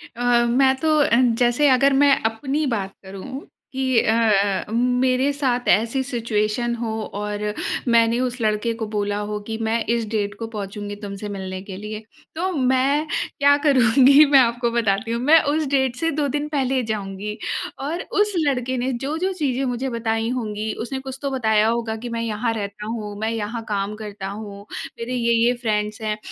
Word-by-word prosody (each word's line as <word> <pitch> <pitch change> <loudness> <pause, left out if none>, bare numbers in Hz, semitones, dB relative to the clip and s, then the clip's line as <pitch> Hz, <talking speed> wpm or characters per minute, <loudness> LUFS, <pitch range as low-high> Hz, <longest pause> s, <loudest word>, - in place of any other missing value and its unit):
अ, 240 0 +2
मैं 265 +2 +4
तो 315 -1 +3
अ, 290 - +3 0.3
जैसे 245 +4 +3
अगर 270 +2 +4
मैं 285 - +6 0.2
अपनी 275 +7 -2
बात 195 -1 -5
करूँ 195 +8 -8 0.3
कि 260 -2 +2
अ, 210 -3 +2
मेरे 250 +3 +2
साथ 255 -3 -1
ऐसी 230 +5 +2
सिचुएशन 235 -1 -1
हो 230 -1 -3 0.3
और 210 0 -3 0.5
मैंने 230 0 +4
उस 250 0 -2
लड़के 215 +1 0
को - - 0
बोला 205 -1 -2
हो 210 0 -3
कि, 220 -1 -3
"मैं 225 +1 0
इस 235 -1 +1
डेट 205 -2 -1
को 225 - -4
पहुँचूँगी 205 -1 -6
तुमसे 205 0 -7
मिलने 190 -2 -5
के 190 -1 -8
लिए।" 210 +2 -6 0.3
तो 365 +4 -1
मैं 270 +3 +2 0.3
क्या 285 0 +6
करूँगी, 270 +2 +6
मैं 280 -1 +6
आपको 235 -1 +2
बताती 225 -1 0
हूँ। 235 +1 -1
मैं 305 +5 +6
उस 310 0 0
डेट 265 -3 +2
से 330 +5 -1
2 290 - +1
दिन 295 0 -1
पहले 270 -3 0
जाऊँगी, 205 0 -4 0.4
और 315 +6 -3 0.2
उस 415 0 +3
लड़के 255 -1 0
ने 255 +2 -1
जो-जो 315 +10 -2
चीज़ें 275 -6 -1
मुझे 260 +2 -3
बताई 225 -1 -1
होंगी, 220 -3 -3
उसने 265 +3 -4
कुछ 265 0 -7
तो 280 - -1
बताया 220 -4 +2
होगा 230 -1 -1
कि, 240 +2 -7
"मैं 230 0 -3
यहाँ 225 +1 -1
रहता 210 -1 -5
हूँ, 215 -2 -5
मैं 220 - 0
यहाँ 225 +1 -4
काम 205 0 -2
करता 205 -2 -6
हूँ, 200 -1 -8 0.3
मेरे 235 +2 -4
ये-ये 235 0 +3
फ्रेंड्स 210 +1 -1
हैं।" 215 -1 -2
235 Hz, 180 wpm, -22 LUFS, 210-260 Hz, 0.5 s, मैं